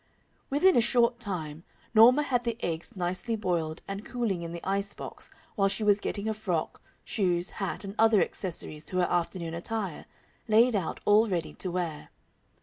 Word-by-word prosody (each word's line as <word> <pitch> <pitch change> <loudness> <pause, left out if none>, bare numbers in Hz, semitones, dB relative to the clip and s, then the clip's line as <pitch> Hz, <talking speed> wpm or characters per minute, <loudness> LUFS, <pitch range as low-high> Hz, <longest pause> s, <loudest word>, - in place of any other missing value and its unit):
Within 335 +7 +4
a 240 - +6
short 240 0 +2
time 170 -8 -3 0.3
Norma 245 +6 +7
had 245 -4 0
the 235 -1 -2
eggs 165 +2 -3
nicely 185 +6 -2
boiled 170 -6 -2
and 195 +1 -5
cooling 225 -8 -2
in 165 -1 -5
the 170 +1 -7
ice 200 +1 -1
box - - -7 0.2
while 195 -2 +2
she 200 +2 -2
was 205 -1 +4
getting 200 0 -3
her 220 - 0
frock, 185 -7 -3 0.2
shoes, 180 -3 +1
hat, 195 +1 -3
and 195 0 -6
other 225 -2 +6
accessories 160 -6 -2
to 185 - -4
her 180 -1 +3
afternoon 170 -1 -1
attire, 190 0 -4 0.4
laid 230 +2 +5
out 190 -5 -2
all 210 +2 +5
ready 170 -4 -2
to 185 - -4
wear. 170 -4 -3
195 Hz, 175 wpm, -28 LUFS, 175-225 Hz, 0.4 s, Norma